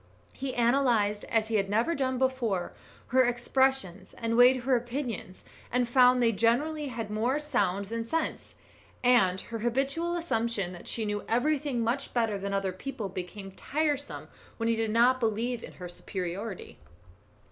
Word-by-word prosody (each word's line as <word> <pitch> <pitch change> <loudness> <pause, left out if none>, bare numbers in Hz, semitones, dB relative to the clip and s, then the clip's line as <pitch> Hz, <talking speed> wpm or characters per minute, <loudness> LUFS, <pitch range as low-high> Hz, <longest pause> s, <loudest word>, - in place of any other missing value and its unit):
He 265 -1 -4
analysed, 235 -4 +2
as 220 -1 0
he 220 - +2
had 195 -1 0
never 225 +10 +2
done 260 -3 -1
before, 245 -8 0 0.4
her 260 +1 +5
expressions, 245 -5 0
and 230 0 -1
weighed 250 +1 +6
her 260 +1 +3
opinions, 240 -6 -4 0.3
and 245 0 +1
found 250 0 +5
they 230 - +4
generally 280 +8 +1
had 225 -4 -5
more 235 +6 +1
sound 205 -10 0
than 230 +3 -3
sense; 320 +8 -3 0.5
and 195 -7 +4
her 230 +3 -6
habitual 275 +9 0
assumption 230 - -1
that 175 -1 -11
she 225 - -2
knew 205 0 -2
everything 275 +1 +1
much 250 +5 -2
better 225 -4 +1
than 200 +1 -4
other 195 -1 0
people, 210 +1 -5
became 195 +1 -7
tiresome 290 +6 -2 0.3
when 230 - -1
he 230 - +2
did 225 -1 -1
not 240 +4 +4
believe 230 +1 -1
in - - -9
her 180 - -8
superiority. 185 +3 -6
235 Hz, 160 wpm, -29 LUFS, 205-260 Hz, 0.5 s, weighed